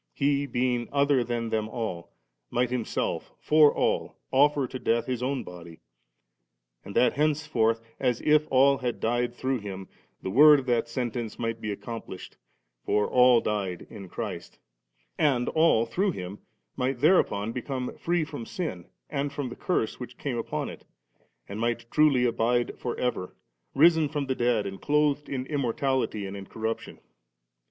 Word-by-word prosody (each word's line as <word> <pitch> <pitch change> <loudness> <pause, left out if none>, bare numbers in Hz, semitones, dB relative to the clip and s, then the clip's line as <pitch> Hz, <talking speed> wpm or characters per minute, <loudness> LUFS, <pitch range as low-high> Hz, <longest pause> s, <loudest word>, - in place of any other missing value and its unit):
He, 140 0 +1
being 120 -1 -1
other 140 -2 +3
than 120 -1 -3
them 110 -1 -1
all, 110 -8 -5 0.4
might 125 0 0
Himself 125 -3 -2
for 150 -1 +5
all - - -1 0.2
ofier 145 0 +4
to 130 - -6
death 115 0 +1
His 125 -2 -3
own 130 -2 -2
bcxly; 85 -2 -11 1.1
and 100 - -9
that 125 - +4
hence 150 +1 +1
forth, 115 -5 +1 0.2
as 125 -3 +1
if 150 0 +3
all 135 +1 +4
had 125 -2 -3
died 120 +1 0
through 130 0 -1
Him, 95 -2 -7 0.4
the 95 - -3
word 150 +6 +8
of 130 - -7
that 120 -2 +1
sentence 120 -2 -3
might 115 -1 -3
be 105 - -3
accomplished 105 -2 -8 0.5
(for 105 - +1
'all 125 -2 +5
died*' 100 -5 -2
in 100 -4 -9
Christ), - - -6 0.6
and 130 -5 +2
all 160 -8 +3
through 185 - 0
Him 95 -1 -7 0.4
might 130 +1 -1
thereupon 140 - +3
become 125 +1 -4
free 175 -1 0
from 145 -5 -6
sin 115 - -5 0.2
and 145 -1 -2
from 140 -2 -4
the 120 - -8
curse 145 -11 -1
which 125 -1 -8
came 125 -5 -3
upon - - -3
it, - - -9 0.6
and 100 +2 -6
might 120 0 -2
truly 145 -5 +4
abides 120 +1 +1
for 120 - -3
ever, 125 -7 -2 0.4
risen 160 -1 +5
from 145 -2 -2
the 130 - 0
dead 120 -4 +1
and 95 -1 -6
clothed 150 0 +1
in 130 -2 -3
immortal!^ 130 -6 -1
and 95 - -7
incorruption. 110 +3 -5
125 Hz, 160 wpm, -27 LUFS, 115-140 Hz, 1.1 s, word